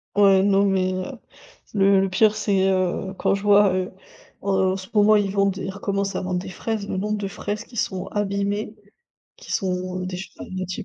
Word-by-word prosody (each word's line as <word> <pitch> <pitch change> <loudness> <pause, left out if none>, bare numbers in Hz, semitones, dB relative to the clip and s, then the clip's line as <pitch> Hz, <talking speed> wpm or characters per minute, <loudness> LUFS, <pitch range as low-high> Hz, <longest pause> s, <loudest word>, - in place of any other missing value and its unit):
Ouais, 195 -2 +6
non, 200 0 +3
mais 190 -1 +1
heu, 185 +7 -5 0.6
le 195 -1 +4
le 195 - +1
pire 210 +3 +3
c'est, 195 -3 +2
heu, 185 0 0
quand - - +2
je 200 - -4
vois, 205 -1 +5
heu 185 0 -2 0.5
heu, 190 -1 +2
en - - -2
ce 190 -1 -8
moment, 210 0 +6
ils 205 -2 +1
vendent 200 -1 +1
ils 190 0 -4
recommencent 200 0 -2
à - - -2
vendre 185 -1 -1
des 185 - -8
fraises, 205 +2 -4
le - - -2
nombre 210 +2 -1
de 200 -1 -3
fraises 205 +1 -5
qui 240 - -15
sont 190 -3 -2
abîmées, 205 +1 -2 0.6
qui - - -13
sont, 185 -1 -2
heu, - - -4
déjà 185 0 -5
à - - -7
moitié 185 0 -4
195 Hz, 210 wpm, -23 LUFS, 185-205 Hz, 0.6 s, Ouais